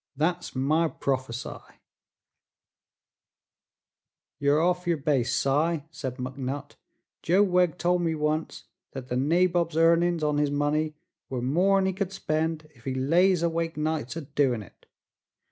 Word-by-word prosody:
Thet's 175 Hz, +2 st, -1 dB
my 155 Hz, +6 st, +2 dB
prophe 130 Hz, -5 st, -2 dB
sigh." 115 Hz, -, -8 dB, 2.6 s
"Yer 145 Hz, +1 st, +3 dB
off 180 Hz, +1 st, +1 dB
yer 170 Hz, -2 st, +2 dB
base, 135 Hz, -5 st, +1 dB
Si," 150 Hz, +3 st, +1 dB
said 130 Hz, -5 st, -5 dB
McNutt 130 Hz, +2 st, -5 dB, 0.5 s
"Joe 185 Hz, +5 st, +4 dB
Wegg 180 Hz, -4 st, +2 dB
tol' 175 Hz, +1 st, +1 dB
me 165 Hz, -2 st, 0 dB
once 155 Hz, +1 st, -2 dB, 0.3 s
thet 130 Hz, -1 st, -7 dB
the 125 Hz, -, -1 dB
nabob's 170 Hz, +4 st, +2 dB
earnin's 170 Hz, 0 st, +3 dB
on 150 Hz, -1 st, +1 dB
his 150 Hz, -1 st, +2 dB
money 150 Hz, +2 st, 0 dB, 0.3 s
were 130 Hz, -, -3 dB
more'n 185 Hz, +10 st, +2 dB
he 190 Hz, -, 0 dB
could 190 Hz, 0 st, -3 dB
spend 155 Hz, -3 st, -2 dB
ef 120 Hz, -4 st, -22 dB
he 130 Hz, -1 st, -2 dB
lays 170 Hz, +7 st, +3 dB
awake 165 Hz, -1 st, -1 dB
nights 155 Hz, -4 st, -2 dB
a 165 Hz, -, -4 dB
doin' 130 Hz, -5 st, 0 dB
it. 95 Hz, -, -20 dB
155 Hz, 140 wpm, -27 LUFS, 135-170 Hz, 2.6 s, Joe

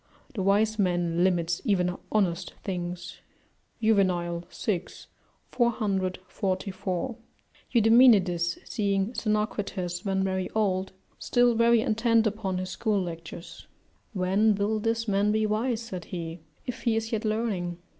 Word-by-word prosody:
["The 215 Hz, -, -3 dB
wise 210 Hz, +3 st, +2 dB
man 175 Hz, -2 st, +1 dB
limits 175 Hz, -2 st, +1 dB
even 180 Hz, -6 st, +1 dB, 0.2 s
honest 185 Hz, -5 st, 0 dB
things." 180 Hz, -2 st, -5 dB, 0.6 s
Juvenal, 175 Hz, -5 st, +2 dB
vi. 190 Hz, -6 st, -1 dB, 0.7 s
444] 190 Hz, -2 st, -1 dB, 0.6 s
Eudemonidas, 215 Hz, -7 st, +5 dB
seeing 200 Hz, +1 st, 0 dB
Xenocrates 205 Hz, -5 st, -2 dB
when 190 Hz, -1 st, 0 dB
very 190 Hz, -1 st, -1 dB
old, 190 Hz, -3 st, 0 dB, 0.3 s
still 245 Hz, -1 st, +3 dB
very 230 Hz, 0 st, +4 dB
intent 225 Hz, +1 st, +2 dB
upon 205 Hz, -3 st, -1 dB
his 185 Hz, 0 st, -4 dB
school 215 Hz, -1 st, 0 dB
lectures: 170 Hz, -1 st, -7 dB, 0.5 s
"When 200 Hz, +3 st, +2 dB
will 205 Hz, +2 st, 0 dB
this 230 Hz, +1 st, -1 dB
man 205 Hz, +1 st, +2 dB
be 215 Hz, 0 st, +2 dB
wise," 220 Hz, +2 st, 0 dB
said 185 Hz, -6 st, -7 dB
he, 170 Hz, -1 st, -6 dB, 0.3 s
"if 250 Hz, -, -5 dB
he 230 Hz, -3 st, +1 dB
is 225 Hz, 0 st, -2 dB
yet 220 Hz, -2 st, -1 dB
learning?" 215 Hz, -6 st, -1 dB
200 Hz, 120 wpm, -27 LUFS, 180-220 Hz, 0.7 s, Eudemonidas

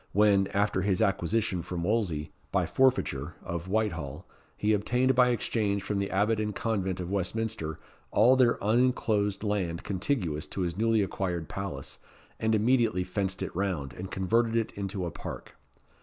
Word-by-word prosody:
when, 100 Hz, -1 st, +4 dB
after 100 Hz, -1 st, +1 dB
his 95 Hz, -1 st, +1 dB
acquisition 100 Hz, 0 st, +1 dB
from 85 Hz, 0 st, -4 dB
Wolsey, 90 Hz, -7 st, 0 dB, 0.2 s
by 95 Hz, -2 st, +2 dB
forfeiture, 85 Hz, -, +1 dB
of 85 Hz, +1 st, -4 dB
Whitehall, 95 Hz, -9 st, -2 dB, 0.3 s
he 105 Hz, +1 st, +2 dB
obtained 125 Hz, +5 st, +2 dB
by 125 Hz, 0 st, +5 dB
exchange 105 Hz, -4 st, 0 dB
from 100 Hz, 0 st, -1 dB
the 100 Hz, 0 st, -1 dB
Abbot 105 Hz, +3 st, +2 dB
and 105 Hz, -2 st, -2 dB
Convent 95 Hz, -5 st, -1 dB
of 90 Hz, 0 st, -4 dB
Westminister 100 Hz, -4 st, -2 dB, 0.3 s
all 120 Hz, +5 st, +5 dB
their 125 Hz, -3 st, +4 dB
uninclosed 110 Hz, -3 st, +2 dB
land 95 Hz, -4 st, -1 dB
contiguous 90 Hz, -, -1 dB
to 95 Hz, -, -4 dB
his 85 Hz, -2 st, -1 dB
newly 110 Hz, +1 st, +2 dB
acquired 90 Hz, -4 st, -2 dB
palace, 95 Hz, -9 st, -6 dB, 0.4 s
and 110 Hz, 0 st, +2 dB
immediately 115 Hz, -4 st, +2 dB
fenced 95 Hz, +1 st, -2 dB
it -, -, -5 dB
round, 85 Hz, -9 st, -2 dB
and 95 Hz, +1 st, -7 dB
converted 115 Hz, +5 st, +1 dB
it 115 Hz, -1 st, +1 dB
into 100 Hz, -2 st, -4 dB
a 85 Hz, -, -3 dB
park. -, -, -8 dB
100 Hz, 155 wpm, -29 LUFS, 90-110 Hz, 0.4 s, by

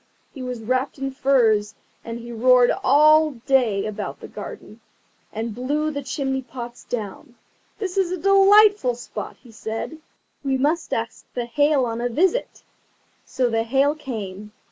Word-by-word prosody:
He 270 Hz, -, -9 dB
was 250 Hz, -2 st, -5 dB
wrapped 255 Hz, +5 st, -1 dB
in 270 Hz, 0 st, -3 dB
furs, 230 Hz, -6 st, +2 dB, 0.3 s
and 230 Hz, 0 st, -6 dB
he 235 Hz, 0 st, -9 dB
roared 245 Hz, +1 st, +4 dB
all 305 Hz, +2 st, +5 dB
day 240 Hz, -7 st, +2 dB
about 215 Hz, -1 st, -5 dB
the -, -, -9 dB
garden, -, -, -10 dB, 0.5 s
and 225 Hz, +1 st, -4 dB
blew 290 Hz, +6 st, -1 dB
the 285 Hz, -1 st, -4 dB
chimney 265 Hz, -1 st, -2 dB
pots 240 Hz, -1 st, -9 dB
down. 235 Hz, +3 st, -6 dB, 0.4 s
"This 395 Hz, -2 st, -4 dB
is 365 Hz, -2 st, +1 dB
a 370 Hz, -, -2 dB
delightful 395 Hz, -, +5 dB
spot," 245 Hz, -, -7 dB
he 245 Hz, -, -17 dB
said, 225 Hz, +8 st, -6 dB, 0.4 s
"we 270 Hz, -1 st, 0 dB
must 305 Hz, +5 st, 0 dB
ask 225 Hz, 0 st, -4 dB
the 245 Hz, -1 st, -2 dB
Hail 290 Hz, +1 st, +2 dB
on 230 Hz, 0 st, -3 dB
a 245 Hz, -, 0 dB
visit." 375 Hz, -, 0 dB, 0.6 s
So 255 Hz, -1 st, 0 dB
the 225 Hz, -1 st, 0 dB
Hail 270 Hz, +5 st, +2 dB
came. 210 Hz, -8 st, -7 dB
255 Hz, 155 wpm, -22 LUFS, 230-295 Hz, 0.6 s, all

